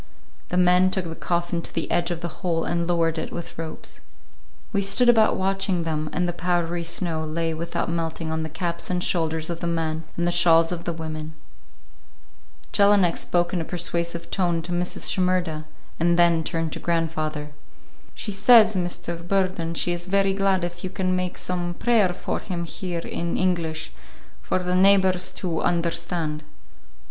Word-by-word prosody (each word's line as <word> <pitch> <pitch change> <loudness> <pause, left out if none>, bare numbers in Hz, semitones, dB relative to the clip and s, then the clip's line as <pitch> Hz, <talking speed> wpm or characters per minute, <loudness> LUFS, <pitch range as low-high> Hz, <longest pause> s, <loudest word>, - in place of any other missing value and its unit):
The 180 - -1
men 180 +1 +5
took 190 -1 -2
the 165 - -5
coffin 175 0 -1
to - - -5
the 165 - -3
edge 170 0 +1
of 170 -1 -3
the 170 -1 -5
hole 170 -3 0
and 170 -1 -1
lowered 165 -2 +1
it - - -5
with 170 - -7
ropes. 160 -1 -7 0.7
We 200 - +2
stood 200 +5 +4
about 225 -2 +5
watching 190 -2 0
them, 155 -1 -2
and 180 0 0
the 175 - -2
powdery 175 0 -1
snow 165 -1 -2
lay 165 +1 -2
without 165 +2 -3
melting 165 -1 -3
on 160 0 -1
the 160 - -4
caps 170 +2 -4
and 180 -1 0
shoulders 160 -1 0
of 170 - -4
the 170 - -2
men 160 -1 -1
and 170 - 0
the 175 - +2
shawls 165 -1 +5
of 170 -1 -4
the 170 - -1
women. 155 -1 -6 1.4
Jelinek 200 -4 +4
spoke 175 0 0
in 175 - 0
a - - -1
persuasive 170 0 -3
tone 175 -3 0
to 175 - -6
Mrs. 175 +1 -1
Shimerda, 180 -4 0 0.3
and 170 +1 +3
then 170 -2 +4
turned 165 0 -2
to - - -4
grandfather. 155 -3 -2 0.6
"She 210 - -5
says, 215 +1 +6
Mr. 175 -1 -2
Burden, 185 -3 0
she 175 - +1
is 175 +1 -4
very 195 0 +2
glad 195 -2 +1
if 175 0 -4
you 185 - -2
can 185 -1 -1
make 180 -1 -2
some 175 -1 -2
prayer 225 -4 +3
for 175 - -3
him 175 -3 -4
here 175 0 -4
in 170 0 -3
English, 170 - -1 0.5
for - - 0
the 180 0 -1
neighbors 190 -1 +4
to 170 -4 -2
understand." 170 -2 -1
175 Hz, 175 wpm, -24 LUFS, 165-185 Hz, 1.4 s, says